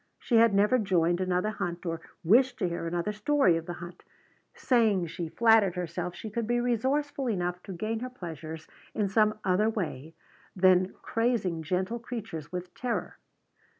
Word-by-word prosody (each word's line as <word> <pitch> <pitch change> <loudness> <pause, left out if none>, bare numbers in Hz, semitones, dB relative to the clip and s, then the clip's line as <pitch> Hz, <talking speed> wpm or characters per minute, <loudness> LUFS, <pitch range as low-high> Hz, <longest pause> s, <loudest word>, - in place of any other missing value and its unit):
She 235 - +1
had 230 0 +6
never 210 +6 +4
joined 175 -4 +1
another 185 +3 0
hunt 175 -4 -4
or 165 -1 -3 0.2
wished 245 +8 +4
to - - 0
hear 170 -1 -3
another 175 +4 -1
story 210 - +3
of 165 0 -4
the 175 - -3
hunt, 175 0 -10 0.5
saying 220 -8 +2
she 165 0 -5
flattered 220 -3 +4
herself 175 0 -4
she 220 - -7
could 230 0 -2
be 240 +1 +1
resourceful 265 +3 0
enough 180 -3 -2
to 195 - -9
gain 215 +5 -3
her 255 +2 -5
pleasures 160 - -8 0.3
in 205 -3 0
some 215 +1 +3
other 195 +3 +2
way 165 - -4 0.4
than 185 0 +4
crazing 225 -8 0
gentle 185 +8 -2
creatures 220 -10 -6
with 180 0 -6
terror. 245 -2 -3
190 Hz, 165 wpm, -28 LUFS, 175-230 Hz, 0.5 s, had